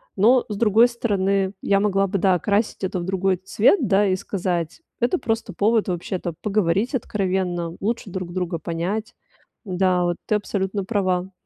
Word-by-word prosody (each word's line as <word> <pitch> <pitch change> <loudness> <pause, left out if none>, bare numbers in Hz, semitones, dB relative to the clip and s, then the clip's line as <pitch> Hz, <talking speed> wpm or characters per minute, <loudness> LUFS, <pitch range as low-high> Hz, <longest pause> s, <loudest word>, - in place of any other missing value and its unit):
Но, 235 +6 +4
с 210 - -3
другой 225 +2 +5
стороны, 195 -5 0
я 200 -1 +2
могла 195 -1 +2
бы, 195 - -1
да, 190 0 +3
окрасить 200 +4 0
это 185 -1 -1
в - - -4
другой 190 0 0
цвет, 205 - +3
да, 205 +1 +3
и 185 - +2
сказать: 180 - -3 0.2
"Это 245 +10 +1
просто 225 -1 -2
повод 220 +1 +2
вообще-то 175 0 -3
поговорить 210 - +1
откровенно, 185 -6 -2
лучше 225 0 -2
друг 180 -1 -5
друга 180 -2 -2
понять". 175 +7 -3 0.5
Да, 185 -1 +1
вот 175 -1 0
ты 215 - +2
абсолютно 200 -1 -2
права. 185 -3 0
195 Hz, 160 wpm, -22 LUFS, 180-210 Hz, 0.5 s, другой